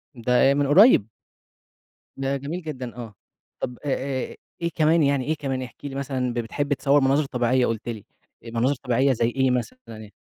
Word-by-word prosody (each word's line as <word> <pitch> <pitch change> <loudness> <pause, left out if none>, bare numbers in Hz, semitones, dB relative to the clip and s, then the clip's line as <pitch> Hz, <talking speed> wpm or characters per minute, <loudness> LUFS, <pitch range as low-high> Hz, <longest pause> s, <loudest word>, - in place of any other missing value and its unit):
ده 120 +1 -3 0.2
آآ - - +4
من 145 -1 +1
قريب؟ 165 - +6 1.1
ده 135 0 -2
جميل 155 +7 -5
جدًا 130 -7 -6
آه، 115 -4 -8 0.5
طب 125 - -4
أ - - -1 0.4
أ - - -11 0.3
إيه 170 - 0
كمان 160 0 +3
يعني، 140 -2 +1
إيه 155 +1 0
كمان 135 -3 -3
احكِ 125 +3 -10
لي 135 -1 -5
مثلًا، 130 -3 -2
ب 120 - -2
بتحب 145 +5 -2
تصور 140 +1 +2
مناظر 140 +2 +2
طبيعية 125 -1 +1
قُلت 115 +1 -3
لي، 110 -3 -6 0.4
مناظر 120 +5 0
طبيعية 130 +2 +1
زي 115 0 +1
إيه 130 +1 +1
مثلًا 125 - -2
يعني؟ 110 -2 -11
135 Hz, 185 wpm, -24 LUFS, 120-145 Hz, 1.1 s, قريب